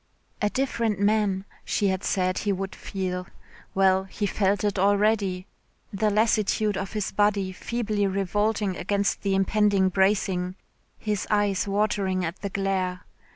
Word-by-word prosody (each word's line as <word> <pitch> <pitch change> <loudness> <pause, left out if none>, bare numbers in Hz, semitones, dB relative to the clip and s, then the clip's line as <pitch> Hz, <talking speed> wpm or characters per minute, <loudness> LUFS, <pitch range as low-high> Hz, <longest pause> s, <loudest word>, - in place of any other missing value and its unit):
"A 210 - +2
different 230 -5 -1
man," 200 -2 +1 0.2
she 200 - +1
had 190 0 -2
said 185 -1 0
he 205 - 0
would 195 0 -3
feel. 180 -2 -4 0.5
Well 190 0 +3
he 205 +2 -3
felt 200 +1 +1
it 205 -2 0
already 200 -2 +2 0.5
the 210 +2 +1
lassitude 215 -1 +2
of 195 +1 -4
his 210 -2 -2
body 205 -2 +1
feebly 210 0 -1
revolting 200 +1 0
against 200 0 0
the 195 -1 +1
impending 195 0 +3
bracing, 190 -1 +1 0.4
his 210 -2 -2
eyes 205 -2 +1
watering 200 -2 0
at 165 +3 -5
the 200 - -3
glare. 190 -2 -1
200 Hz, 140 wpm, -26 LUFS, 190-210 Hz, 0.5 s, Well